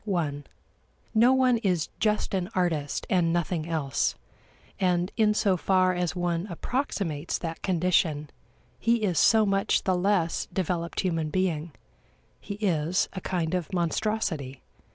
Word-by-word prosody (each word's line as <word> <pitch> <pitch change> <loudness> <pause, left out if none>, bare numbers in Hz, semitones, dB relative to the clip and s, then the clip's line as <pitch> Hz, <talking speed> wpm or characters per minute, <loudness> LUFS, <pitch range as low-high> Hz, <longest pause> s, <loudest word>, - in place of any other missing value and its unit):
(i) 155 -5 0 0.8
No 235 +3 +5
one 260 -2 +4
is 180 -7 0
just 210 -2 0
an 185 -1 -1
artist 160 -6 -1
and 175 -3 +2
nothing 170 -1 -1
else, 145 -6 0 0.6
and 180 -1 +1
in 215 -2 +3
so 195 -3 +2
far 185 +1 +2
as 180 -1 -1
one 175 +1 -1
approximates 175 - -2
that 165 -1 -5
condition, 165 -5 +1 0.5
he 230 -1 +2
is 180 -7 +1
so 220 -1 +5
much 195 -1 +1
the 190 - +1
less 180 -2 +1
developed 175 -2 -2
human 165 -4 -1
being; 170 -2 -1 0.7
he 200 - -6
is 180 -4 0
a 185 - -5
kind 175 -3 -2
of 180 -4 -2
monstrosity. 170 -6 -1
180 Hz, 135 wpm, -27 LUFS, 165-195 Hz, 0.8 s, No